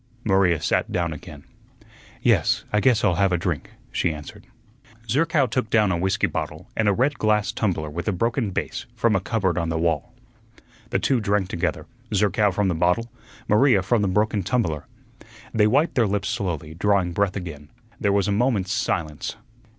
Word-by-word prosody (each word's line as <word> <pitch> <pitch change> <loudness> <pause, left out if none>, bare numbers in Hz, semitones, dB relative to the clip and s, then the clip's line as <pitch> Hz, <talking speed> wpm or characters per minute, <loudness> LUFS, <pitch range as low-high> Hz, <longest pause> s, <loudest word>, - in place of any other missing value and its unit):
Maria 95 -5 +3
sat - - 0
down 85 -2 -1
again. 75 -1 -11 0.8
"Yes, - - +2
I 105 - +4
guess 120 -1 +3
I'll 90 -5 +2
have 95 -1 +3
a 90 - +2
drink," 85 -5 -3 0.2
she 85 - 0
answered. 75 -1 -10 0.6
Zerkow 150 +4 +2
took 115 -1 -2
down 105 -3 +3
a 85 - 0
whiskey 95 +2 +1
bottle - - -4
and 110 - +1
a - - +5
red 130 +7 +1
glass 105 -2 +2
tumbler 90 -8 -1
with 85 +6 -5
a - - +3
broken 115 +4 0
base 95 - -4
from 115 -2 +2
a - - +3
cupboard 95 -2 0
on 85 -1 -2
the 80 - -1
wall. 80 - 0 0.8
The - - +1
two 130 -3 +1
drank 100 -2 0
together, 85 - -2 0.3
Zerkow 105 +1 +3
from 100 +1 0
the 90 - +1
bottle, 90 +8 +1 0.4
Maria 105 -2 +4
from 105 +4 +2
the 100 - +1
broken 105 +2 +1
tumbler. 90 - -1 0.7
They 105 -2 +4
wiped 145 +9 +2
their 120 -4 +2
lips 100 0 -1
slowly, 80 -5 -3
drawing 95 0 +1
breath 100 +2 0
again. 80 -6 -7 0.3
There 100 - +1
was 100 -2 +2
a - - +1
moment's 105 -3 +1
silence. 75 +2 -2
100 Hz, 180 wpm, -23 LUFS, 85-110 Hz, 0.8 s, a